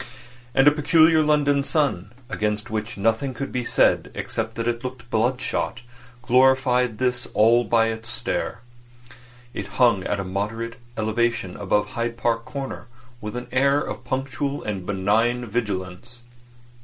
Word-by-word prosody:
And 135 - +5
a - - +9
peculiarly 160 +1 +4
London 145 -2 +3
sun—against 110 - -2
which 110 +1 -3
nothing 115 +6 0
could 135 +4 -4
be 125 - -2
said - - +2
except 110 0 -3
that 115 0 -3
it 120 +1 -1
looked 125 -1 -7
bloodshot—glorified 125 +1 +1 0.4
all 115 +3 +5
this 105 - -12
by 115 -1 +4
its 110 +1 -6
stare. 120 -1 -3 0.9
It - - -5
hung 115 -7 +4
at 100 - -1
a - - -2
moderate 110 +5 -4 0.2
elevation 110 -3 0
above 105 +1 0
Hyde 115 0 -3
Park 115 -1 0
Corner 135 -3 -6 0.3
with 105 +2 -6
an 125 0 -4
air 140 +2 +3
of - - -5
punctual 135 +1 -3
and 95 -4 -4
benign 110 +5 +1
vigilance. 105 0 -4
120 Hz, 135 wpm, -23 LUFS, 110-130 Hz, 0.9 s, a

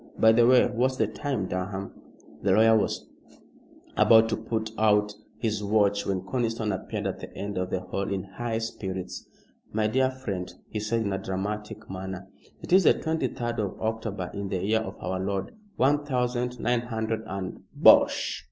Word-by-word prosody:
By 110 - +6
the 115 +1 +5
way, 125 0 +6
what's 130 +2 0
the 110 - +3
time, 110 0 -3
Durham?" 95 +2 -4 0.5
The 95 - +3
lawyer 110 +2 +6
was 110 - 0 0.9
about 115 0 +6
to 110 - +1
pull 110 0 -2 0.2
out 105 -1 +3 0.2
his 110 -3 -1
watch 100 -1 +2
when 95 -2 0
Conniston 115 -1 -1
appeared 95 - -4
at - - -2
the - - -8
end 100 +1 -4
of 90 0 -2
the 95 - -1
hall 100 +2 -3
in 95 -1 -1
high 110 +4 -4
spirits. 95 -5 -5 0.4
"My 110 0 0
dear 130 +4 +2
friend," 105 -9 -5 0.2
he 110 - -4
said 115 +2 0
in 100 -3 -1
a 95 - -1
dramatic 105 +3 -4
manner, 95 0 -6 0.4
"it - - -3
is 190 -2 +6
the - - +7
twenty 160 0 -1
third 120 -2 -4
of 100 -3 -3
October, 110 -4 -3
in 100 -1 -4
the 95 0 -2
year 110 +2 +3
of 110 - -5
our 95 0 -3
Lord 95 0 -2 0.2
one 145 +3 +3
thousand 125 -2 -1
nine 120 +1 +1
hundred 110 -2 -2
and 95 -1 -5
" - - -38
"Bosh!" - - +5
110 Hz, 185 wpm, -27 LUFS, 95-115 Hz, 0.9 s, the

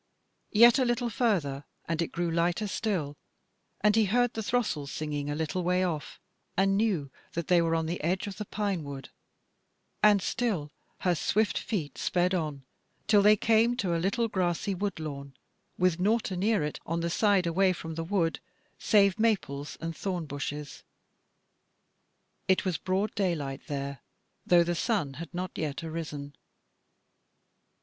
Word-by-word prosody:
Yet 235 +4 +7
a - - +4
little 240 -1 0
further, 185 - 0 0.2
and 165 0 -1
it 165 - 0
grew 175 -1 -1
lighter 170 +5 +1
still, 185 -9 -2 0.6
and 210 0 +4
he 220 -1 +4
heard 245 +4 +2
the 225 - -3
throstles 205 - -1
singing 145 -2 -3
a 145 - -1
little 160 +4 -2
way 180 +1 +2
off, 160 -5 -3 0.4
and 195 +1 +3
knew 195 -10 0 0.2
that 170 +1 -4
they 175 -1 +5
were 165 0 +1
on 160 0 0
the 170 0 -3
edge 180 +4 0
of 200 -2 -6
the 210 - -4
pine 200 -5 -2
wood, 140 -2 -7 0.9
and 210 -1 +6
still 195 -10 -1 0.3
her 180 - +2
swift 210 +5 +1
feet 155 - -3
sped 180 +1 +1
on 150 -6 -2 0.4
till 210 -2 +5
they 210 +1 +7
came 230 +3 +3
to 180 -7 0
a 165 - 0
little 200 +6 +1
grassy 185 -1 -1
wood 195 -1 -3
lawn, 140 -3 -6 0.4
with 180 -2 +2
nought 215 +3 +1
anear 195 0 +1
it 150 - -3
on 165 +1 -2
the 170 - -1
side 200 -1 +3
away 185 +3 +3
from 165 -2 -5
the 165 +1 -3
wood 165 -2 0 0.4
save 200 -1 +4
maples 170 -11 0
and 165 0 -4
thorn 180 -1 -3
bushes: 145 0 -5 1.7
it 190 +1 +3
was 180 -4 0
broad 190 +3 -1
daylight 155 -9 -2
there, 140 -2 -4 0.5
though 175 -1 +6
the 175 +1 -1
sun 170 - 0
had 160 +3 -8
not 180 +1 -4
yet 150 -1 -3
arisen. 150 -3 -5
175 Hz, 160 wpm, -29 LUFS, 155-205 Hz, 1.7 s, Yet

